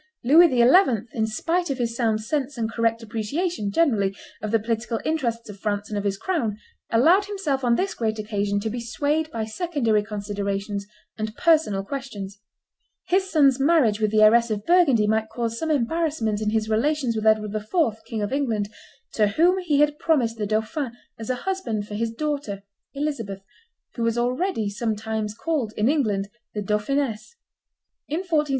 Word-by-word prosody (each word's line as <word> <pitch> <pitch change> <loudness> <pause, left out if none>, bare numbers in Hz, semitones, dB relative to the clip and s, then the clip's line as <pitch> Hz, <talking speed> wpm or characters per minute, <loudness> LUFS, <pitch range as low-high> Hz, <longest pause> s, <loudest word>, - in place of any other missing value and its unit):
Louis 325 +8 +7
XI., 250 - +5
in 220 -2 0
spite 335 +11 -1
of 275 - -1
his 235 -2 -2
sound 225 -3 +1
sense 280 +2 -2
and 225 -1 -2
correct 230 0 0
appreciation, 225 - -2
generally, 200 -7 +2 0.3
of 215 - -3
the 225 - +3
political 230 +1 -2
interests 240 -8 -1
of 205 -2 -10
France 205 -1 -2
and 210 - -3
of 200 - -5
his 200 -1 0
crown, 235 - -1 0.3
allowed 335 - +4
himself 340 -10 -2
on 240 -1 +3
this 385 +5 -1
great 220 -2 -2
occasion 205 -1 -1
to 220 - -2
be 240 - -4
swayed 290 +7 -1
by 225 -6 -3
secondary 230 - 0
considerations 200 -1 -3 0.3
and 215 +1 -3
personal 310 - +3
questions. 205 -6 -6 0.7
His 380 +1 +2
son's 275 -6 +4
marriage 270 -8 +3
with 215 -1 +2
the 215 0 +4
heiress 230 +2 +5
of 210 -1 -3
Burgundy 320 -11 +4
might 220 +1 +1
cause 230 0 -3
some 320 - -2
embarrassment 280 -6 0
in 215 - 0
his 220 0 0
relations 250 +2 +1
with 220 0 -1
Edward 215 -1 +3
IV., 220 - 0
King 225 -3 -3
of 205 - -3
England, 225 -8 0 0.4
to 210 -2 +3
whom 345 - +3
he 300 -6 +2
had 295 0 +2
promised 255 -10 +1
the 210 -2 -2
dauphin 220 +5 -1 0.3
as 225 - -6
a 255 - +1
husband 235 - -2
for 210 - -8
his 225 +2 -1
daughter 275 -7 -3 0.3
Elizabeth, 230 -10 -3 0.5
who 235 - -6
was 230 0 +1
already 250 - 0
sometimes 215 0 -3
called, 265 -6 -2
in 210 - +2
England, 215 -10 +1 0.3
the 210 - -1
Dauphiness. 220 - -1
230 Hz, 170 wpm, -24 LUFS, 215-290 Hz, 0.7 s, Louis